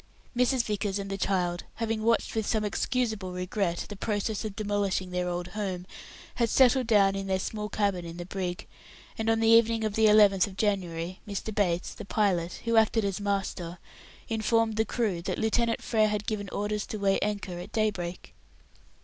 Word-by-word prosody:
Mrs. 250 0 +3
Vickers 205 -2 -1
and 195 0 -5
the - - -1
child, 180 -3 0
having 225 -1 -2
watched 230 +1 +1
with 220 -2 -1
some 215 -2 +1
excusable 215 -3 -1
regret 180 -1 -2
the 205 - -7
process 210 +1 -2
of 215 -3 -5
demolishing 200 -3 -1
their 180 0 -1
old 175 0 -3
home, 185 -2 -4 0.5
had 235 -2 +1
settled 255 0 +4
down 200 -4 +5
in 195 0 -3
their 190 -1 +1
small 210 +2 -4
cabin 200 -5 0
in 170 0 -8
the 175 - -6
brig, 180 -1 -4 0.5
and 225 0 -1
on 225 0 +3
the 225 - +2
evening 230 0 +5
of 215 -1 -1
the 220 +1 +4
11th 205 -3 +6
of 195 -1 -11
January, 185 -4 -1
Mr. 205 +2 -4
Bates, 180 -4 0
the - - -9
pilot, 185 -5 0
who 230 0 +2
acted 220 -1 +4
as 200 +1 -2
master, 195 -4 -2 0.5
informed 225 0 +1
the 220 +1 +2
crew 210 -9 -1
that - - -3
Lieutenant 230 +1 +1
Frere 215 -2 +3
had 210 0 -2
given 205 -3 -3
orders 205 +1 -2
to 215 - -4
weigh 195 -1 +2
anchor 200 -4 -3
at 180 +4 -8
daybreak. 195 -5 -2
205 Hz, 185 wpm, -28 LUFS, 185-220 Hz, 0.5 s, 11th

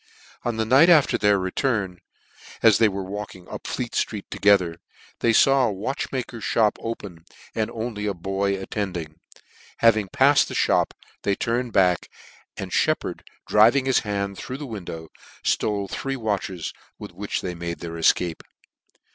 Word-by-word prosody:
On 120 -2 -2
the 110 - 0
night 135 +9 +6
after 155 -5 +5
tne$r 105 -1 +3
return, 95 -1 -1 0.6
as 110 -3 +6
they 110 -2 +5
were 100 0 -4
walking 95 -2 -7
up - - -8
Fleet 125 -2 -3
(tree: 105 -3 -2
together, 90 -5 +3 0.4
they 115 - +3
faw 135 +3 +5
a - - -1
watchmaker's 120 +2 -4
fhop 110 -1 +2
open, 100 -7 -6 0.3
and 110 -1 -1
only 110 -2 -4
a 100 - -1
boy 95 +2 -1
attend 95 -1 -3
ing: 80 -1 -8 0.6
having 110 -3 +4
pafled 140 +6 +4
the - - -6
Uxop - - +2 0.3
they 100 - +1
turned 120 +3 -1
back, 90 -3 +3 0.5
and - - -6
Shcppard - - 0 0.3
driving 115 +6 +5
his 130 -1 +3
hand 100 -2 -3
through 130 - -5
the 145 - -6
win 110 -8 -7
dow, 80 -1 -7 0.3
ftole 100 -2 0
three 135 +7 -3
watches, 100 - -3 0.2
with - - -9
which 100 +4 -4
they 90 - -4
made 85 0 -5
their 85 - -5
efcape. 85 0 +1
105 Hz, 160 wpm, -24 LUFS, 95-115 Hz, 0.6 s, night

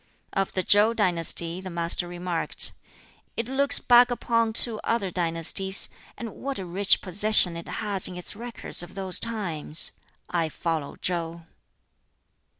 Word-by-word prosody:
Of 195 0 -3
the 185 - -3
Chow 210 +5 +2
dynasty 175 -3 +2
the 190 - -9
Master 170 +1 -1
remarked, 175 -1 -2 0.7
"It 230 - -2
looks 275 +2 +2
back 245 0 +4
upon 230 -1 -2
two 220 0 +5
other 215 -5 -3
dynasties; 175 +3 +3 0.3
and 230 -2 -8
what 275 0 -6
a 190 - -7
rich 190 +3 +1
possession 195 -2 +5
it 170 - -9
has 205 -4 +1
in 180 - -9
its 180 - -3
records 235 -4 -2
of 175 - -8
those 190 -2 -2
times! 175 -9 -2 0.4
I 165 -2 -3
follow 160 -2 -5
Chow!" 170 -1 -5
190 Hz, 145 wpm, -24 LUFS, 170-220 Hz, 0.7 s, two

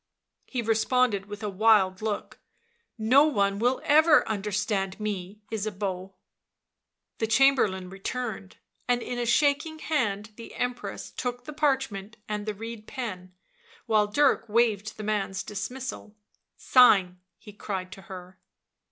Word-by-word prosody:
He 245 -3 -3
responded 225 -2 +1
with 205 +1 -8
a - - -1
wild 200 -2 +3
look. 215 -1 -4 0.3
" - - -41 0.2
No 250 +7 +5
one 200 -9 +1
will 245 +3 +2
ever 310 0 +5
understand 205 -1 -2
me, 205 -1 -5
Ysabeau." 195 -3 -4 1.0
The 225 - 0
Chamberlain 225 -7 +3
returned, 195 +1 -5 0.3
and 245 -1 +1
in 245 - -4
a 240 - -1
shaking 295 +5 +2
hand 215 -10 -1
the 230 - -10
Empress 245 0 -4
took 245 -1 -4
the 300 - -8
parchment 265 -8 -1
and 210 0 -4
the 215 - -2
reed 225 +1 -8
pen, 185 -8 -6 0.5
while 215 -2 +3
Dirk 235 +1 +2
waved 215 -2 +1
the 215 - -6
man's 200 -2 -2
dismissal. 215 +1 -6 0.3
" - - -57
Sign," 195 -8 +5 0.2
he 210 - -13
cried 190 -3 -5
to 195 - -10
her. 185 0 -11
215 Hz, 135 wpm, -27 LUFS, 195-245 Hz, 1.0 s, No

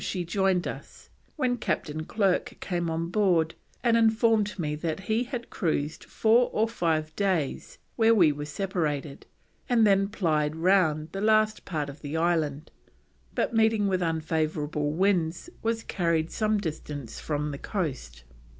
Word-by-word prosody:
she 180 -3 -2
joined 190 0 +1
us, - - -9 0.2
when 255 -5 0
Captain 155 -7 -2
Clerke 195 -2 0
came 175 -2 -2
on 165 +1 -2
board 175 -5 +2 0.3
and 235 -2 +4
informed 220 -2 +3
me 150 -4 -2
that 160 +3 -3
he 220 +5 0
had 245 -2 -6
cruised 155 -4 -2
four 230 +3 +3
or 220 +1 +1
five 160 -8 -1
days 185 -9 -1 0.2
where 225 0 +5
we 170 -7 +5
were 145 0 -5
separated 150 -4 -3 0.4
and 235 -3 +4
then 195 -1 +4
plyed 155 -7 0
round 160 -3 +2
the 195 - -4
last 215 0 +2
part 155 -5 -2
of 140 +1 -10
the 150 +2 -4
Island, 160 -3 0 0.6
but - - 0
meeting 220 -2 +3
with 185 -2 0
unfavourable 155 -2 -1
winds, 175 - 0
was 225 0 -1
carried 170 -3 0
some 215 -1 +1
distance 150 - -5
from 150 -1 -2
the 140 - -6
coast. 130 - -4
175 Hz, 150 wpm, -27 LUFS, 155-215 Hz, 0.6 s, where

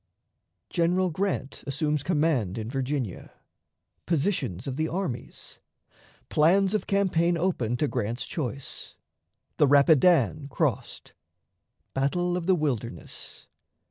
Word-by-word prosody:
General 180 +1 +2
Grant 170 -6 -2
assumes 150 +1 0
Command 145 - +1
in 110 +1 -4
Virginia. 135 -6 -3 0.7
Positions 160 - 0
of 135 - -3
the 155 +2 0
Armies. 165 -9 -5 0.7
Plans 185 +6 +3
of 215 - -1
Campaign 175 -4 +2
open 130 -10 0
to 150 - +1
Grant's 120 -1 -2
Choice. 140 -3 -5 0.6
The 145 - +5
Rapidan 150 +1 +4
crossed. 140 - -2 0.8
Battle 175 +7 0
of 180 -1 -3
the 190 - +5
Wilderness. 120 - -4
150 Hz, 105 wpm, -27 LUFS, 130-175 Hz, 0.8 s, The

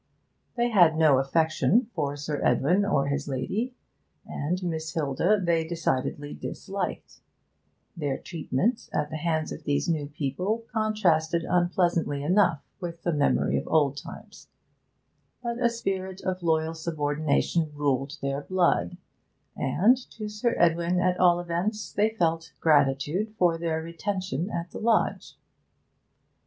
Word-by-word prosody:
They 240 0 +1
had 175 -7 +5
no 155 -5 +5
affection 160 - +2
for 145 -4 -2
Sir 145 0 -3
Edwin 180 +8 +3
or 195 -9 +1
his 140 0 -2
lady, 195 - -2 0.5
and 180 +6 -3
Miss 160 -2 -3
Hilda 165 +7 +2
they 170 -3 +1
decidedly 145 -3 -2
disliked; 195 0 -5 0.8
their 145 -5 -2
treatment 175 - -2
at 150 - -1
the 155 - -3
hands 160 -1 -1
of - - -7
these 145 +4 0
new 155 -4 0
people 155 - -2
contrasted 175 -7 +1
unpleasantly 175 -5 +1
enough 175 -1 +3 0.2
with 170 -2 -6
the 175 - 0
memory 140 - +2
of - - -8
old 145 -3 +2
times; 145 - -11 1.0
but 235 0 -3
a 240 - +4
spirit 190 -5 -3
of 185 0 -2
loyal 160 -1 +1
subordination 155 0 0
ruled 140 0 -1
their 140 +1 -1
blood, 175 - +1 0.6
and, 185 - +3 0.2
to 215 -2 -6
Sir 215 +3 -1
Edwin 170 +1 +2
at 180 0 +1
all 175 -1 +5
events, 175 +5 -2
they 210 +2 +3
felt 165 -6 -1
gratitude 150 +7 +2
for 175 -2 +3
their 165 -1 -2
retention 185 0 -3
at 170 -3 -4
the - - -7
lodge. 225 0 0
170 Hz, 135 wpm, -27 LUFS, 145-185 Hz, 1.0 s, had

